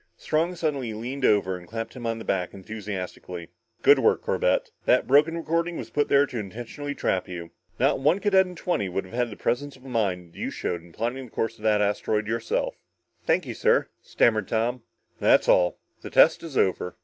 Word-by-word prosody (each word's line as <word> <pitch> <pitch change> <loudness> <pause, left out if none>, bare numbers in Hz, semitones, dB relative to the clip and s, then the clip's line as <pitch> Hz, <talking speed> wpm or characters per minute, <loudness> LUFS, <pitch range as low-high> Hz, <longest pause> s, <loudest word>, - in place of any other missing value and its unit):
Strong 165 +4 0
suddenly 140 -9 -2
leaned 130 +5 -5
over 100 -5 +3
and 90 -1 -10
clapped 115 +1 -5
him 120 -2 -5
on 115 0 -1
the 115 - -8
back 90 -1 -1
enthusiastically. 95 -4 -6 0.3
"Good - - +7
work, - - +3
Corbett. - - +1
That 125 - +4
broken 150 +5 +4
recording 165 +1 -1
was 115 -1 -7
put 145 +3 +1
there 140 0 +5
intentionally 120 +3 -5
to - - -19
trap 95 - 0
you. 85 -2 -7 0.3
Not - - +2
one 150 +7 +3
cadet 195 -2 +3
in 180 - -9
twenty 170 - -1
would 95 +2 -3
have 95 - -14
had 120 0 0
the 105 - -8
presence 135 +4 -1
of 130 - -19
mind 95 -9 -2
you - - -3
showed 85 -1 -3
in 85 0 -17
plotting 120 +8 -3
the - - -14
course 115 0 -2
of 105 - -16
that 105 -1 +3
asteroid 105 +1 0
yourself." 115 +2 -2 0.5
"Thank - - +2
you, - - -5
sir," - - +2
stammered 110 -2 +2
Tom. 120 +3 0 0.4
"That's - - +4
all 90 -1 +4 0.2
the - - -7
test - - +5
is 160 -5 -6
over. 90 -1 +1
115 Hz, 200 wpm, -26 LUFS, 100-140 Hz, 0.5 s, Good